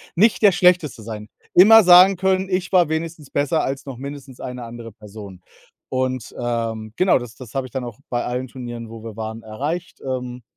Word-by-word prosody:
Nicht 215 Hz, +6 st, +3 dB
der 205 Hz, -2 st, +7 dB
Schlechteste 180 Hz, -9 st, +2 dB
sein. 105 Hz, -1 st, -8 dB, 0.3 s
Immer 220 Hz, +4 st, +9 dB
sagen 180 Hz, +2 st, +8 dB
können, 190 Hz, +1 st, 0 dB
ich 185 Hz, 0 st, -2 dB
war 175 Hz, -4 st, +4 dB
wenigstens 160 Hz, -2 st, -4 dB
besser 145 Hz, +3 st, 0 dB
als 135 Hz, +1 st, -4 dB
noch 135 Hz, -, -7 dB
mindestens 140 Hz, -1 st, -9 dB
eine 125 Hz, -1 st, -6 dB
andere 115 Hz, -1 st, -9 dB
Person. 100 Hz, -3 st, -12 dB, 0.5 s
Und, 130 Hz, -2 st, -3 dB
ähm, 115 Hz, -2 st, -3 dB
genau, 185 Hz, -5 st, +4 dB
das 120 Hz, -2 st, -9 dB
das 125 Hz, -1 st, -12 dB
habe 135 Hz, -1 st, -2 dB
ich 125 Hz, -, -20 dB
dann 130 Hz, -2 st, -4 dB
auch 120 Hz, +1 st, -9 dB
bei 120 Hz, -1 st, -2 dB
allen 125 Hz, +1 st, -3 dB
Turnieren, 120 Hz, -2 st, -8 dB
wo 115 Hz, 0 st, -10 dB
wir 110 Hz, -1 st, -9 dB
waren, 110 Hz, +1 st, -6 dB
erreicht. 145 Hz, +11 st, -5 dB
Ähm 125 Hz, -1 st, -4 dB
130 Hz, 195 wpm, -21 LUFS, 115-165 Hz, 0.5 s, Immer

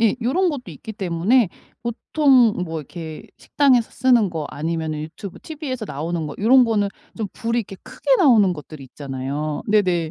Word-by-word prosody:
이 225 Hz, 0 st, +3 dB
요런 330 Hz, +11 st, +1 dB
것도 250 Hz, -, -5 dB
있기 220 Hz, +9 st, -9 dB
때문에 195 Hz, +4 st, +2 dB, 0.3 s
보통 240 Hz, -4 st, +3 dB
뭐 160 Hz, -2 st, -4 dB
이렇게 160 Hz, +1 st, -8 dB, 0.2 s
식당에서 260 Hz, -6 st, +2 dB
쓰는 240 Hz, -5 st, +3 dB
거 160 Hz, -3 st, -4 dB
아니면 160 Hz, 0 st, -3 dB
유튜브 160 Hz, +5 st, -7 dB
티브이에서 285 Hz, -7 st, -6 dB
나오는 160 Hz, +1 st, -3 dB
거 -, -, -6 dB
요런 255 Hz, +4 st, +6 dB
거는 210 Hz, -3 st, +1 dB, 0.3 s
좀 215 Hz, -3 st, -3 dB
불이 230 Hz, +1 st, -1 dB
이렇게 195 Hz, -2 st, -9 dB
크게 -, -, +1 dB
나오는 230 Hz, -, +5 dB
것들이 150 Hz, -2 st, -10 dB
있잖아요. 140 Hz, +3 st, -4 dB
네네. 180 Hz, -6 st, +2 dB
200 Hz, 370 characters per minute, -21 LUFS, 160-245 Hz, 0.3 s, 요런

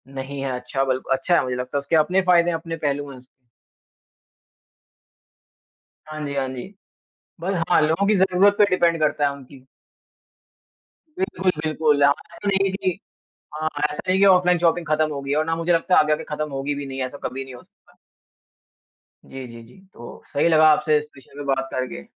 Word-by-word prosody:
नहीं 135 Hz, +1 st, -5 dB
है 135 Hz, -1 st, -2 dB
अच्छा। 135 Hz, +2 st, -2 dB
बल 130 Hz, -1 st, -1 dB
अच्छा 135 Hz, +7 st, +1 dB
है -, -, +3 dB
मुझे 125 Hz, -1 st, -3 dB
लगता 125 Hz, +3 st, -3 dB
है -, -, +2 dB
उसके 150 Hz, -, -1 dB
अपने 180 Hz, +5 st, +3 dB
फ़ायदे 175 Hz, -1 st, +3 dB
हैं, 165 Hz, -, -1 dB
अपने 165 Hz, 0 st, -6 dB
पहलू 145 Hz, -2 st, -2 dB
हैं 130 Hz, -, -11 dB
उस 125 Hz, -, -17 dB, 2.8 s
हाँ 155 Hz, 0 st, -7 dB
जी, 140 Hz, -, -4 dB
हाँ 135 Hz, -1 st, -1 dB
जी। 130 Hz, +10 st, -8 dB, 0.7 s
बस 190 Hz, +3 st, -2 dB, 0.2 s
हाँ 175 Hz, -, +5 dB
लोगों 165 Hz, +6 st, +1 dB
की 215 Hz, -, +3 dB
ज़रूरत 190 Hz, +1 st, +4 dB
पे 210 Hz, -, +7 dB
डिपेंड 170 Hz, -2 st, +2 dB
करता 150 Hz, -1 st, +1 dB
है -, -, +1 dB
उनकी। 135 Hz, -1 st, -14 dB, 1.5 s
बिल्कुल, 190 Hz, -, 0 dB
बिल्कुल। 155 Hz, -2 st, +1 dB
हाँ, 145 Hz, -, +6 dB, 0.2 s
ऐसा 205 Hz, -, -6 dB
नहीं 195 Hz, 0 st, +2 dB
है -, -, -4 dB
कि 190 Hz, -1 st, -2 dB, 0.6 s
हाँ, 155 Hz, +1 st, -2 dB, 0.2 s
ऐसा 150 Hz, +4 st, -4 dB
ही 190 Hz, -, +2 dB
है 200 Hz, -, +6 dB
ऑफ़्लाइन 180 Hz, -1 st, +4 dB
शॉपिंग 170 Hz, 0 st, +1 dB
ख़त्म 155 Hz, 0 st, +2 dB
हो 140 Hz, -, -4 dB
गई 140 Hz, -, -6 dB
है। 145 Hz, -, +1 dB
और 155 Hz, -, +2 dB
ना 165 Hz, 0 st, -1 dB
मुझे 165 Hz, +1 st, 0 dB
लगता 170 Hz, +2 st, +2 dB
है -, -, +7 dB
आगे 155 Hz, 0 st, +2 dB
आकर 150 Hz, -, -1 dB
ख़त्म 150 Hz, 0 st, -4 dB
होगी 140 Hz, +1 st, -3 dB
भी 145 Hz, 0 st, -6 dB
नहीं 135 Hz, 0 st, -6 dB
ऐसा 140 Hz, +2 st, -7 dB
कभी 135 Hz, +1 st, -4 dB
नहीं 130 Hz, -1 st, -11 dB
हो 125 Hz, -, -12 dB
सकता। -, -, -30 dB, 1.3 s
जी, 130 Hz, -1 st, -9 dB
जी, 115 Hz, 0 st, -11 dB
जी। 120 Hz, +11 st, -18 dB, 0.2 s
तो 120 Hz, -, -11 dB
सही 145 Hz, +4 st, +2 dB
लगा 155 Hz, -1 st, +5 dB
आपसे 150 Hz, 0 st, +2 dB
इस 150 Hz, -, -8 dB
विषय 135 Hz, -, -18 dB
पे 145 Hz, -, -5 dB
बात 135 Hz, 0 st, -4 dB
करके। 130 Hz, -, -4 dB
150 Hz, 205 wpm, -22 LUFS, 135-175 Hz, 2.8 s, पे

